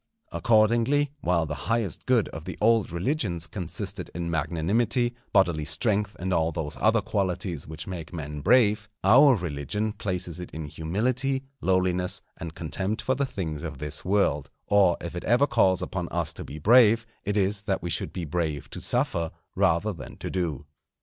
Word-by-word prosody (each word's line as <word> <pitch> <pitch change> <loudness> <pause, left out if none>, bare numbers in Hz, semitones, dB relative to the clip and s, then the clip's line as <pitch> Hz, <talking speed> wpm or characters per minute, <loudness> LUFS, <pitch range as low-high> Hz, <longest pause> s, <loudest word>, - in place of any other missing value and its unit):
Accordingly, 120 +6 +3
while 85 - +1
the 75 - -4 0.2
highest 115 -7 -1
good 125 -5 +3
of 80 0 -8
the 95 - -6
old 115 -3 +3
religions 90 - -1
consisted 95 +1 -5
in 85 -1 -3
magnanimity, 100 - +1 0.2
bodily 85 -7 +3
strength, 105 +6 0
and 95 +1 -1
all 80 -1 +2
those 75 -2 -4
other 110 +1 +3
qualities 95 -6 -2
which 80 +1 -6
make 85 -4 -6
men 75 -3 -5
brave, 105 - +3
our 130 +7 +7
religion 90 - -3
places 90 -4 -3
it 90 - -6
in 80 -1 -4
humility, 120 - -1 0.2
lowliness, 90 -1 +1
and 80 -1 -7
contempt 95 +7 -2
for 130 - 0
the 140 +1 -1
things 80 - -4
of 75 -4 -5
this 75 +1 -3
world; 90 -7 +1 0.2
or 100 -4 +4
if 85 0 -6
it 85 - -4
ever 120 +5 +4
calls 110 -9 +2
upon - - -3
us - - -1
to - - -7
be 75 - -8
brave, 115 +5 +5 0.2
it 105 +1 -1
is 100 0 +1
that 100 -5 -2
we 85 - -2
should - - -1
be 90 - -4
brave 80 -2 -2
to - - -7
suffer 85 -1 0 0.2
rather 100 +6 +2
than 85 - -10
to - - -5
do. 80 -6 -2
95 Hz, 175 wpm, -26 LUFS, 80-110 Hz, 0.2 s, our